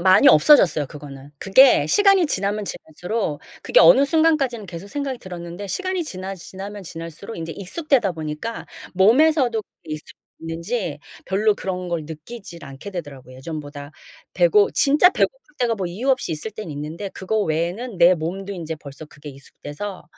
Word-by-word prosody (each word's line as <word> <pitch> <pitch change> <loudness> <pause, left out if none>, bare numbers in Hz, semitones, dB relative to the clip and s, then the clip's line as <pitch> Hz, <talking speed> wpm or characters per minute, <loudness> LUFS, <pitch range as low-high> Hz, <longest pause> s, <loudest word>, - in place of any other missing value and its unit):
많이 185 0 +6
없어졌어요 155 - +5
그거는. 140 0 -11
그게 260 +8 +5
시간이 395 -4 +4
지나면 205 -4 -1
지날수록 175 0 -4 0.2
그게 - - +4
어느 275 - +7
순간까지는 285 -8 +1
계속 175 +2 -9
생각이 275 0 -4
들었는데 175 +1 -8
시간이 370 - -2
지나 190 -8 -6
지나면 195 +3 -9
지날수록 165 +5 -8
이제 165 0 -5
익숙하다 230 - 0
보니까 160 +8 -6 0.3
몸에서도 240 - +3
그게 155 -3 -10
익숙해졌는지 165 +3 -6 0.3
별로 210 +2 +2
그런 185 -3 -4
걸 170 -2 -2
느끼질 170 +3 -10
않게 135 +9 -9
되더라고요 140 -8 -8
예전보다. 145 0 -8 0.4
배고 425 -3 +4
진짜 300 +4 +5
배고플 - - 0 0.2
때가 240 -2 +1
뭐 195 -4 -3
이유 210 +11 -2
없이 255 -9 0
있을 155 +8 -5
때는 215 -6 -8
있는데 155 +7 -6
그거 195 +3 -3
외에는 185 +7 -2
내 175 +1 +6
몸도 185 +5 -5
인제 165 -4 -5
벌써 145 +1 -11
그게 150 0 -11
익숙해서 145 +8 -9
190 Hz, 390 characters per minute, -22 LUFS, 160-235 Hz, 0.4 s, 어느